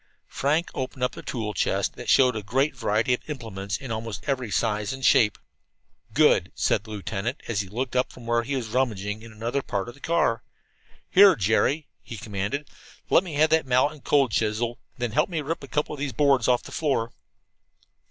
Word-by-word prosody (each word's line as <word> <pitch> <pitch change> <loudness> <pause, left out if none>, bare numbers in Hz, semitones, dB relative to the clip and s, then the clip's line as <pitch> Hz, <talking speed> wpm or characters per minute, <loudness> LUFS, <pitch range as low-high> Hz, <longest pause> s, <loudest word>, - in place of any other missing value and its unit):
Frank 150 +5 0
opened 130 0 -4
up 125 - 0
a - - -8
tool 110 -3 -4
chest - - 0
that - - -7
showed 125 -3 +5
a 110 - -2
great 135 +8 0
variety 115 0 +1
of 125 - -4
implements 105 -8 -4
in 135 -4 -8
almost 110 -1 -4
every 130 -5 -1
size 105 +1 0
and 135 -1 -4
shape. 105 -3 +5 0.7
"Good," - - +4
said - - +1
the 110 - -14
lieutenant, 105 +4 -4
as 105 -3 0
he 100 - -7
looked 125 +5 -3
up 125 - +1
from 120 - -13
where 120 0 +2
he 135 +4 -3
was 120 -4 -3
rummaging 110 -4 -1
in 115 0 -11
another 115 +5 -2
part 100 -6 -3
of 120 - -7
the 135 - -20
car. 165 -9 +1 0.7
"Here, 195 0 +8
Jerry," 110 +9 +1 0.2
he 115 - -8
commanded, 105 +8 -3 0.4
"let 175 - +6
me 170 -6 -6
have 155 +2 +3
that 160 -3 +3
mallet 130 +4 +3
and 150 - -16
cold 140 -5 +3
chisel 115 +2 -1 0.2
and 125 - -6
then 120 - -1
help 110 - +2
me 165 -3 -2
rip 150 +1 -3
a - - -8
couple 150 +3 -1
of 150 - -7
these 140 -2 -3
boards 140 -5 +3
off 125 -1 +3
the - - -11
floor." 135 -7 0
125 Hz, 210 wpm, -25 LUFS, 110-140 Hz, 0.7 s, Here